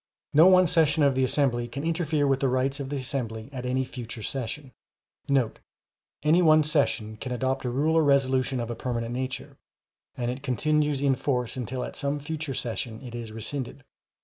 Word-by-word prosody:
No 160 Hz, +4 st, +8 dB
one 185 Hz, -1 st, +7 dB
session 160 Hz, -3 st, +3 dB
of 140 Hz, -1 st, +4 dB
the 130 Hz, 0 st, +1 dB
assembly 125 Hz, -3 st, +1 dB
can 140 Hz, +4 st, -6 dB
interfere 160 Hz, -3 st, 0 dB
with 135 Hz, -1 st, +2 dB
the 135 Hz, -, +1 dB
rights 130 Hz, +2 st, 0 dB
of 135 Hz, -1 st, -4 dB
the 145 Hz, -, -3 dB
assembly 125 Hz, -4 st, -4 dB
at 125 Hz, -1 st, -4 dB
any 130 Hz, +1 st, 0 dB
future 115 Hz, -3 st, -7 dB
session,* 135 Hz, +3 st, -4 dB, 1.5 s
[Any 160 Hz, +4 st, +4 dB
one 155 Hz, -2 st, +6 dB
session 115 Hz, -8 st, 0 dB
can 130 Hz, +3 st, -6 dB
adopt 130 Hz, +2 st, -1 dB
a -, -, 0 dB
rule 145 Hz, +6 st, +1 dB
or 160 Hz, -, +5 dB
resolution 135 Hz, -2 st, +2 dB
of 120 Hz, 0 st, -3 dB
a -, -, -4 dB
permanent 120 Hz, -1 st, -3 dB
nature, 130 Hz, +1 st, -5 dB, 0.6 s
and 120 Hz, 0 st, -1 dB
it 130 Hz, +2 st, -6 dB
continues 145 Hz, +2 st, +1 dB
in 140 Hz, -1 st, +4 dB
force 125 Hz, -3 st, -1 dB
until 125 Hz, 0 st, -3 dB
at -, -, -6 dB
some 140 Hz, +1 st, -1 dB
future 150 Hz, -1 st, -4 dB
session 115 Hz, -1 st, -3 dB
it 125 Hz, -2 st, -8 dB
is 115 Hz, -2 st, -6 dB
rescinded. 125 Hz, +4 st, -5 dB
130 Hz, 185 wpm, -27 LUFS, 125-145 Hz, 1.5 s, No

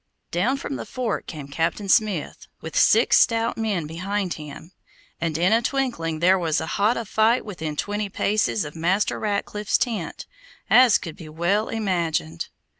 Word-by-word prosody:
Down 230 Hz, +11 st, +1 dB
from 275 Hz, 0 st, -5 dB
the -, -, -6 dB
fort 250 Hz, -3 st, -3 dB
came 150 Hz, -4 st, -7 dB
Captain 165 Hz, +8 st, -2 dB
Smith, 195 Hz, -5 st, +1 dB
with 160 Hz, -1 st, -8 dB
six 225 Hz, +3 st, +5 dB
stout 230 Hz, 0 st, +2 dB
men 210 Hz, -7 st, -1 dB
behind 185 Hz, +4 st, -3 dB
him, 150 Hz, +2 st, -10 dB, 0.5 s
and 165 Hz, -2 st, -1 dB
in 180 Hz, +5 st, +3 dB
a 230 Hz, -, +4 dB
twinkling 225 Hz, -, -2 dB
there 185 Hz, +2 st, +5 dB
was 165 Hz, -3 st, 0 dB
as 160 Hz, -, -4 dB
hot 210 Hz, +6 st, +1 dB
a 230 Hz, -, -3 dB
fight 220 Hz, +4 st, +2 dB
within 160 Hz, -7 st, -5 dB
twenty 205 Hz, +5 st, -2 dB
paces 215 Hz, 0 st, 0 dB
of 150 Hz, -, -8 dB
Master 180 Hz, +5 st, 0 dB
Ratcliffe's 210 Hz, 0 st, -1 dB
tent, 215 Hz, -10 st, -3 dB, 0.5 s
as 245 Hz, -3 st, +7 dB
could 165 Hz, -3 st, -8 dB
be 160 Hz, -3 st, -10 dB
well 175 Hz, +7 st, 0 dB
imagined. 170 Hz, -, -2 dB
190 Hz, 165 wpm, -23 LUFS, 165-220 Hz, 0.5 s, as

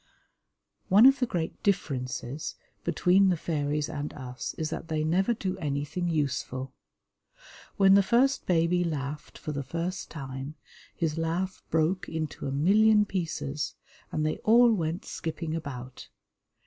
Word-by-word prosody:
One 205 Hz, +5 st, +7 dB
of 270 Hz, 0 st, +7 dB
the 250 Hz, -, +1 dB
great 170 Hz, -6 st, -3 dB
differences 135 Hz, -7 st, -2 dB, 0.3 s
between 190 Hz, +2 st, +4 dB
the 180 Hz, -, +2 dB
fairies 150 Hz, -2 st, -1 dB
and 150 Hz, -2 st, -4 dB
us 125 Hz, -3 st, -6 dB
is 160 Hz, 0 st, -3 dB
that -, -, -5 dB
they 155 Hz, -1 st, -1 dB
never 190 Hz, +8 st, +2 dB
do 190 Hz, -3 st, -3 dB
anything 150 Hz, +4 st, -2 dB
useful. 135 Hz, -4 st, -2 dB, 1.0 s
When 195 Hz, -2 st, +6 dB
the 200 Hz, -, +7 dB
first 250 Hz, +7 st, +2 dB
baby 175 Hz, 0 st, +3 dB
laughed 150 Hz, -3 st, -4 dB
for 155 Hz, -, -5 dB
the 140 Hz, -1 st, -3 dB
first 170 Hz, +7 st, -4 dB
time, 135 Hz, 0 st, -6 dB, 0.4 s
his 165 Hz, -1 st, -1 dB
laugh 175 Hz, +3 st, -2 dB
broke 165 Hz, +4 st, +1 dB
into 155 Hz, -3 st, -4 dB
a -, -, -2 dB
million 210 Hz, +9 st, +5 dB
pieces, 160 Hz, -6 st, -3 dB, 0.4 s
and 155 Hz, -, -1 dB
they 155 Hz, -, 0 dB
all 235 Hz, +1 st, +6 dB
went 170 Hz, -1 st, -2 dB
skipping 160 Hz, 0 st, -4 dB
about. 130 Hz, -5 st, -7 dB
160 Hz, 140 wpm, -28 LUFS, 145-190 Hz, 1.0 s, One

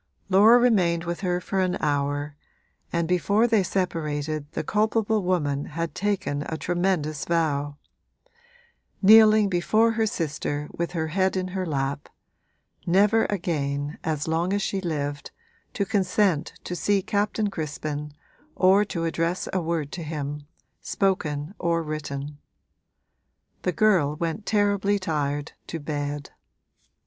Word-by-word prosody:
Laura 210 Hz, +5 st, +7 dB
remained 185 Hz, -9 st, +3 dB
with 170 Hz, 0 st, -3 dB
her 180 Hz, -2 st, 0 dB
for 190 Hz, +1 st, -2 dB
an 185 Hz, -1 st, +1 dB
hour, 145 Hz, 0 st, -1 dB, 0.6 s
and 170 Hz, -1 st, 0 dB
before 200 Hz, +5 st, +2 dB
they 225 Hz, -3 st, +3 dB
separated 155 Hz, -5 st, -2 dB
the 160 Hz, -, -2 dB
culpable 215 Hz, +3 st, +1 dB
woman 150 Hz, -6 st, 0 dB
had 165 Hz, +1 st, -4 dB
taken 195 Hz, -8 st, -1 dB
a 160 Hz, -, -3 dB
tremendous 175 Hz, -4 st, -1 dB
vow 145 Hz, -4 st, 0 dB, 1.3 s
kneeling 215 Hz, 0 st, +7 dB
before 215 Hz, +5 st, +2 dB
her 225 Hz, -1 st, +1 dB
sister 150 Hz, -5 st, -3 dB
with 170 Hz, +1 st, -3 dB
her 160 Hz, -2 st, -2 dB
head 190 Hz, +3 st, +1 dB
in 185 Hz, 0 st, -2 dB
her 185 Hz, -1 st, -3 dB
lap 140 Hz, -1 st, -2 dB, 0.8 s
never 205 Hz, +5 st, +4 dB
again, 145 Hz, -6 st, -2 dB
as 155 Hz, -2 st, -2 dB
long 170 Hz, +4 st, 0 dB
as 205 Hz, -1 st, 0 dB
she 195 Hz, -, -2 dB
lived, 145 Hz, -4 st, -3 dB, 0.4 s
to 200 Hz, -, -1 dB
consent 190 Hz, -5 st, +1 dB
to 180 Hz, -, -4 dB
see 200 Hz, +1 st, +1 dB
Captain 205 Hz, 0 st, 0 dB
Crispin 150 Hz, -2 st, -4 dB, 0.4 s
or 190 Hz, +2 st, +5 dB
to 170 Hz, -5 st, -3 dB
address 165 Hz, +2 st, -1 dB
a 185 Hz, -, +1 dB
word 160 Hz, -3 st, -2 dB
to 175 Hz, -, -5 dB
him, 150 Hz, -2 st, -5 dB, 0.3 s
spoken 155 Hz, -5 st, -1 dB
or 170 Hz, -1 st, 0 dB
written. 145 Hz, -2 st, -5 dB, 1.2 s
The 180 Hz, -, 0 dB
girl 175 Hz, -6 st, +3 dB
went 170 Hz, +6 st, -3 dB
terribly 205 Hz, -1 st, +2 dB
tired 145 Hz, -4 st, -2 dB, 0.2 s
to 165 Hz, -, -5 dB
bed. 145 Hz, -1 st, -4 dB
170 Hz, 130 wpm, -25 LUFS, 150-195 Hz, 1.3 s, Laura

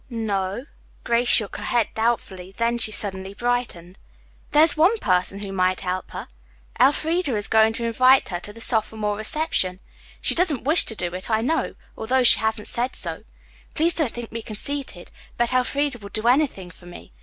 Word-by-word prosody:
"No 220 Hz, -4 st, -2 dB
o 190 Hz, +1 st, -5 dB
o." -, -, -17 dB, 0.4 s
Grace 235 Hz, +1 st, +1 dB
shook 210 Hz, -4 st, +3 dB
her -, -, -7 dB
head 235 Hz, -3 st, +1 dB
doubtfully. 205 Hz, -5 st, -2 dB
Then 235 Hz, +1 st, 0 dB
she 220 Hz, -, +2 dB
suddenly 195 Hz, -2 st, -4 dB
brightened. 220 Hz, -7 st, -3 dB, 0.5 s
"There 300 Hz, +1 st, +5 dB
is 320 Hz, -, +3 dB
one 350 Hz, +9 st, +4 dB
person 190 Hz, -, 0 dB
who 195 Hz, -1 st, -6 dB
might 185 Hz, -1 st, +1 dB
help 185 Hz, 0 st, -3 dB
her. -, -, -7 dB, 0.5 s
Elfreda 295 Hz, +2 st, +2 dB
is 205 Hz, 0 st, -2 dB
going 220 Hz, 0 st, +4 dB
to 235 Hz, +1 st, -4 dB
invite 255 Hz, +3 st, +4 dB
her 175 Hz, -, -3 dB
to 205 Hz, -, -8 dB
the 230 Hz, +2 st, -12 dB
sophomore 215 Hz, -2 st, -1 dB
reception. 215 Hz, -, -1 dB, 0.4 s
She -, -, 0 dB
doesn't 330 Hz, -9 st, +1 dB
wish 310 Hz, +6 st, +5 dB
to 225 Hz, -, -1 dB
do 175 Hz, -3 st, -2 dB
it, 185 Hz, +4 st, -5 dB
I 220 Hz, -1 st, +2 dB
know, 315 Hz, +7 st, -1 dB, 0.2 s
although 255 Hz, +3 st, +1 dB
she 245 Hz, -, +6 dB
hasn't 220 Hz, -1 st, -2 dB
said 245 Hz, +2 st, -1 dB
so. -, -, -4 dB, 0.5 s
Please 335 Hz, +2 st, +2 dB
don't 305 Hz, -8 st, +1 dB
think 240 Hz, -1 st, -8 dB
me 230 Hz, -, -5 dB
conceited, 220 Hz, -2 st, -5 dB, 0.3 s
but 240 Hz, +1 st, 0 dB
Elfreda 255 Hz, +1 st, 0 dB
would 200 Hz, -1 st, -11 dB
do 215 Hz, +1 st, -1 dB
anything 245 Hz, -9 st, +1 dB
for 175 Hz, +1 st, -17 dB
me. 175 Hz, -, -12 dB
225 Hz, 190 wpm, -23 LUFS, 200-255 Hz, 0.5 s, she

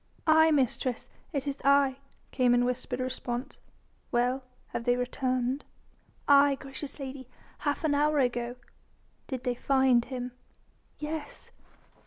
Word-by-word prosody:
"Aye, 315 Hz, 0 st, +6 dB
mistress, 260 Hz, -4 st, 0 dB, 0.2 s
it 285 Hz, -3 st, -2 dB
is 280 Hz, -1 st, -3 dB
I!" 275 Hz, -1 st, +4 dB, 0.3 s
came 250 Hz, -2 st, +3 dB
in 245 Hz, 0 st, +3 dB
whispered 250 Hz, +1 st, -2 dB
response. 255 Hz, -1 st, -4 dB, 0.5 s
"Well? 250 Hz, +2 st, +1 dB, 0.3 s
Have 230 Hz, -, -4 dB
they 245 Hz, -1 st, +4 dB
returned?" 255 Hz, +1 st, -1 dB, 0.6 s
"Aye! 280 Hz, 0 st, +6 dB
gracious 275 Hz, +2 st, -6 dB
lady. 265 Hz, -2 st, -7 dB, 0.3 s
Half 290 Hz, +2 st, -1 dB
an 310 Hz, -2 st, +2 dB
hour 300 Hz, +1 st, +2 dB
ago." 245 Hz, -2 st, 0 dB, 0.7 s
"Did 260 Hz, -3 st, -4 dB
they 250 Hz, -, 0 dB
find 260 Hz, -1 st, +3 dB
him?" 250 Hz, -1 st, -5 dB, 0.7 s
"Yes." 300 Hz, 0 st, -6 dB
260 Hz, 125 wpm, -29 LUFS, 250-285 Hz, 0.7 s, Aye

